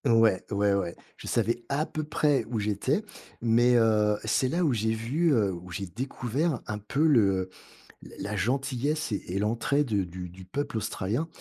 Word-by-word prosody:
Ouais. 115 -5 +4
Ouais, 100 -1 +2
ouais. 90 -3 -1 0.2
Je - - -10
savais 120 +1 0
à 145 +2 +1
peu 155 - -4
près 150 -3 +2
où 115 -3 -1
j'étais. 105 - 0 0.4
Mais, 120 +1 +4
heu, 105 -2 +3
c'est 120 +4 +2
là 170 +7 0
où 150 -6 +3
j'ai 110 0 +1
vu, 135 +10 +1
heu, 105 -6 +2
où 90 +1 -9
j'ai 100 +3 -4
découvert 130 - -2
un 105 -1 -4
peu 135 +9 0
le 100 -10 +3 0.5
la 100 - -7
la 105 - -2
gentillesse 135 +7 -1
et - - +2
-et 90 +2 -2
l'entraide 120 +7 +1 0.2
du 90 +1 -7
du 90 +2 -12
peuple 145 +6 -3
australien. 110 - -2
115 Hz, 180 wpm, -28 LUFS, 100-140 Hz, 0.5 s, Ouais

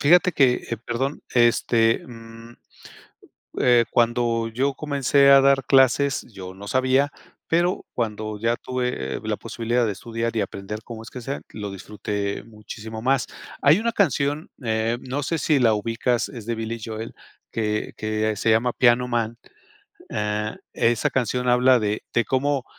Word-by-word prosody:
fijate 175 +5 +5
que, 130 -4 +4 0.2
eh, 115 - -1
perdón, 120 +5 -3
este, 120 -1 +3
mm, 115 -1 -12 1.1
eh, 120 -2 +5
cuando 120 -1 +1
yo 130 +5 -1
comencé 140 -1 +2
a 135 0 +8
dar 135 -1 +3
clases, 135 +1 +4
yo 95 -1 -8
no 100 +2 -10
sabía, 130 +3 +2 0.4
pero 175 +3 +1
cuando 110 -2 -3
ya 115 +2 +1
tuve, 125 0 -3 0.3
eh-eh, - - -4
la - - -1
posibilidad 120 +1 -1
de 105 - 0
estudiar, 115 +3 -4
y 110 - +1
aprender 100 +2 -5
cómo 115 -2 -8
es - - -11
que 125 - -8
sea, 135 +4 -4
lo 105 -2 -6
disfruté 100 +1 -4
muchísimo 110 0 -9
más. 130 +1 +1 0.3
Hay 150 +7 +5
una 230 +1 0
canción, 150 - 0
eh, 110 +1 0
no 135 +3 -3
sé 165 +5 -1
si 150 -2 +2
la 115 -3 +4
ubicas, 115 +2 -1
es 115 -5 -9
de 115 0 -2
Billy 115 +1 -4
Joel, 110 0 -6 0.4
que 105 -1 -2
que 110 0 -1
se 110 - 0
llama 115 +3 +3
Piano 125 0 +3
Man, 115 -1 -1 0.7
ah, 105 0 -2 0.2
esa 115 -1 +1
canción 125 0 -1
habla 125 +1 +5
de 105 0 -1
de 120 - +3
cómo 135 0 0
120 Hz, 160 wpm, -23 LUFS, 110-130 Hz, 1.1 s, a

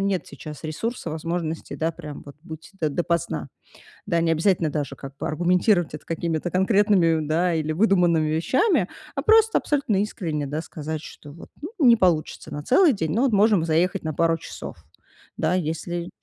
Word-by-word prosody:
нет 195 -2 -1
сейчас 150 0 -10
ресурса, 225 +10 -4
возможностей, 165 0 -4
да, 165 +1 -1
прям 150 -3 -9
вот 145 0 -12
быть 160 0 -10
до 155 - +2
допоздна. 150 - -2 0.6
Да, 170 - +1
необязательно 165 +1 +2
даже 145 -1 -3
как 135 0 -10
бы - - -3
аргументировать 175 +2 +2
это 150 - -8
какими-то 165 0 -2
конкретными, 190 -5 +3
да, 170 +4 +1
или 155 -1 -1
выдуманными 175 -4 +3
вещами, 215 - +2 0.3
а 275 - -1
просто 445 +5 +5
абсолютно 270 -9 0
искренне, 160 -8 -3
да, 150 +3 -3
сказать, 155 -1 -6
что, 145 - -12
ну 145 - -14
вот, - - -12 0.3
не 245 -6 +7
получится 175 -7 0
на 145 - -5
целый 305 - +4
день, 160 -7 -2
но 260 +5 +2
можем 205 -4 +3
заехать 175 +4 +1
на 155 -1 -3
пару 165 +2 +2
часов. - - -8 0.6
Да, 160 +3 +1
если 175 0 -3
170 Hz, 165 wpm, -24 LUFS, 155-195 Hz, 0.6 s, не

